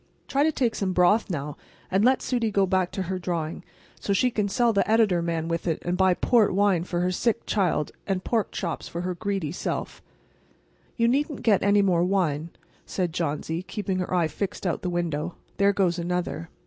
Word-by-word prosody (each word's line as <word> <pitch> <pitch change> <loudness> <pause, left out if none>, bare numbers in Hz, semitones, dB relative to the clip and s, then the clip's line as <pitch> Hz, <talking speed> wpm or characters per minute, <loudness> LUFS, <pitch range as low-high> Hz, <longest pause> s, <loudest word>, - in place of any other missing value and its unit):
Try 275 - +1
to 315 +2 +4
take 245 -6 0
some 190 -2 -1
broth 180 +5 +3
now, 150 -4 -4 0.3
and 190 +2 +3
let 255 +2 +3
Sudie 240 -3 0
go 200 -2 +2
back 185 -1 +1
to 190 - -2
her 185 +1 -3
drawing, 170 -2 -3 0.4
so 200 - -1
she 250 +6 +2
can 210 -3 0
sell 240 +1 +2
the 200 - +1
editor 215 -6 +3
man 165 -1 -2
with 165 +1 -2
it, 160 - +1
and 175 +1 -1
buy 185 -1 +3
port 220 -4 +3
wine 195 -4 +3
for 175 -1 -2
her 180 +1 +1
sick 230 +5 0
child, 180 -7 0 0.2
and 190 -2 -1
pork 225 -3 0
chops 170 -4 -4
for 170 - -5
her 180 0 -2
greedy 195 -5 -2
self." 180 - -4 1.0
"You 230 -1 +3
needn't 285 +3 0
get 215 -5 +4
any 200 0 +4
more 175 -3 +3
wine," 170 -5 0 0.3
said 180 -4 -2
Johnsy, 160 0 -2
keeping 190 -1 -3
her 180 - -3
eyes 175 -3 +1
fixed 200 -1 -4
out 175 - -1
the 180 - -2
window. 175 -2 -2 0.2
"There 200 0 +4
goes 185 -3 +1
another. 170 -1 -3
185 Hz, 200 wpm, -26 LUFS, 175-205 Hz, 1.0 s, to